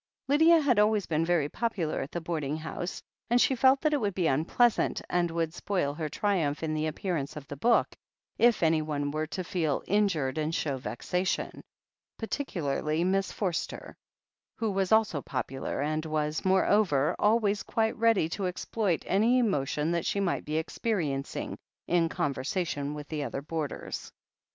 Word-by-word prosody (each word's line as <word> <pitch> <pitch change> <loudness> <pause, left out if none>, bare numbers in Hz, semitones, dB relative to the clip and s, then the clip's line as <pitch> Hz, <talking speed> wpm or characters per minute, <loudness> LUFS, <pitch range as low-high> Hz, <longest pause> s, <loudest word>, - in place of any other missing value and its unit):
Lydia 320 +4 +6
had 265 -8 +3
always 210 -2 +3
been 160 0 0
very 165 -4 +2
popular 190 -4 -2
at 135 - -6
the 175 - -3
boarding 155 -3 -2
house, 160 +3 -5 0.3
and 240 +1 +4
she 265 - +4
felt 265 +2 +4
that 305 -1 +2
it 290 - +1
would 200 -4 -1
be 185 - 0
tmpleasant, 165 - +2
and 175 -1 +2
would 165 -1 -1
spoil 180 -7 -1
her 155 0 -4
triumph 165 -5 0
in 155 -1 -1
the 155 0 0
appearance 155 -2 -3
of 145 -2 -8
the 145 - -6
book, 235 - +2 0.4
if 235 -5 +4
anyone 155 -3 +1
were 155 +1 -2
to 185 - -4
feel 165 -6 -1
injured 170 -9 +1
and 155 +2 -1
show 145 -3 -1
vexation 180 +9 -2 0.3
— - - -65
particularly 165 - -2
Miss 190 +1 +1
Forster, 185 -5 -3 0.6
who 225 -2 -1
was 195 -1 0
also 220 -9 +3
popular, 135 +1 -3
and 155 +2 -1
was, 155 0 -1
morever, 190 -6 +3
always 210 -1 +2
quite 220 -1 0
ready 225 -7 +3
to 190 +2 -2
exploit 180 0 -1
any 225 +6 +3
emo 205 - +2
tion 150 +3 -1
that 170 -1 -1
she 200 - 0
might 190 -3 -1
be 150 +1 -2
experiencing, 160 -5 -2 0.3
in 170 -1 +2
conversation 145 +1 -2
with 150 -1 -7
the 150 -2 -2
other 140 0 -4
boarders. 155 -1 -5
170 Hz, 165 wpm, -29 LUFS, 150-205 Hz, 0.6 s, Lydia